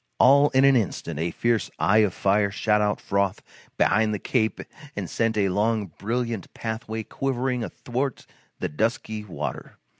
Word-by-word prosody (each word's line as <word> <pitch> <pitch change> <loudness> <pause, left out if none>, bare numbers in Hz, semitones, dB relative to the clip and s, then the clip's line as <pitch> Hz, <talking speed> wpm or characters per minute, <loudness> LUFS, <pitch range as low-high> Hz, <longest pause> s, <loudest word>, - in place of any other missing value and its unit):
All 140 +3 +6
in 130 +1 +4
an 140 -1 +6
instant 85 - -1
a 85 +2 0
fierce 115 0 0
eye 105 +3 +4
of 105 -4 +2
fire 100 +1 +2
shot 105 +1 +1
out 105 0 +1
from 100 -1 0 0.4
behind 105 +2 +3
the - - -2
cape 110 +2 0 0.4
and 100 -3 -3
sent 115 +5 0
a 100 -2 +2
long 105 0 0
brilliant 115 -2 -2
pathway 110 0 -4
quivering 130 0 -2
athwart 130 +4 -3 0.3
the - - -2
dusky 110 +4 -2
water. 100 -5 -6
110 Hz, 155 wpm, -25 LUFS, 100-120 Hz, 0.4 s, All